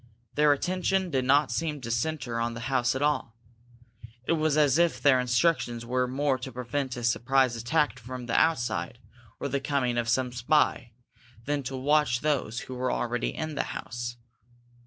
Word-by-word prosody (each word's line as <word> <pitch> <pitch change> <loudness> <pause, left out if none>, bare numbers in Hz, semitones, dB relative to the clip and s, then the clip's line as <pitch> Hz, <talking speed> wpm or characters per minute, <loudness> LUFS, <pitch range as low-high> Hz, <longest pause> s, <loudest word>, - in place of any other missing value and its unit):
Their 150 0 +4
attention 185 +4 0
did 130 -3 0
not 140 +1 +4
seem 150 +3 -2
to 115 -1 -5
centre 125 -2 -2
on 115 0 -1
the 115 - -6
house 125 0 +2
at 135 - -1
all. 145 -6 0 0.9
It - - +1
was 155 -2 +2
as 150 0 +4
if 170 -1 +2
their 140 -3 +5
instructions 125 -2 +1
were 125 +1 0
more 135 +1 0
to 130 +2 -6
prevent 125 +1 -3
a 120 - -5
surprise 125 +2 +2
attack 130 +4 0
from 125 +1 -7
outside, 120 - +1 0.4
or - - -2
the 140 0 -1
coming 135 -3 0
of 115 -1 -1
some 125 +1 +1
spy, 125 -1 +1 0.5
than 145 0 -1
to 135 0 -5
watch 145 -2 +2
those 135 -7 -1
who 130 - -8
were 125 0 -1
already 120 0 -1
in 155 -1 -4
the 140 - 0 0.2
house. 120 0 -6
130 Hz, 175 wpm, -27 LUFS, 120-150 Hz, 0.9 s, their